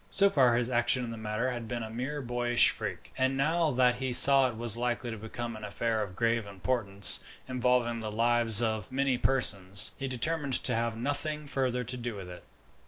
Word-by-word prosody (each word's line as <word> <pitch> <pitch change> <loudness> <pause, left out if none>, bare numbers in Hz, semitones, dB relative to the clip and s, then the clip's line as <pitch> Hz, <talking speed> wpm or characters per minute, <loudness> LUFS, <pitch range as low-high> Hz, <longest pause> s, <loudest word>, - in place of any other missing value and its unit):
So 200 0 +3
far 125 -4 +2
his 125 +1 -2
action 120 +1 +2
in 115 - -7
the - - -7
matter 110 +3 -3
had 120 -2 -7
been 120 -1 -5
a 110 - -8
mere 130 +5 -5
boyish 120 0 +3
freak; - - -8
and 130 +1 0
now 160 +4 0
that 125 -2 +1
he 130 0 -4
saw 135 +1 +8
it 115 - -9
was 115 -1 +2
likely 120 0 -3
to 110 - -7
become 115 +2 -7
an 110 - -11
affair 110 +2 -3
of 95 -3 -7
grave 115 -1 -1
importance, 100 -1 0 0.3
involving 125 -2 -1
the 110 -1 -6
lives 115 0 +3
of 110 -3 -3
many 135 -1 -1
persons, 100 -8 +1
he 135 - -4
determined 140 +3 -2
to 125 - +3
have 115 0 -3
nothing 145 +4 -4
further 130 -3 -3
to 125 +2 -4
do 120 -2 -6
with 95 -3 -9
it. 90 - -12
120 Hz, 205 wpm, -28 LUFS, 110-130 Hz, 0.3 s, saw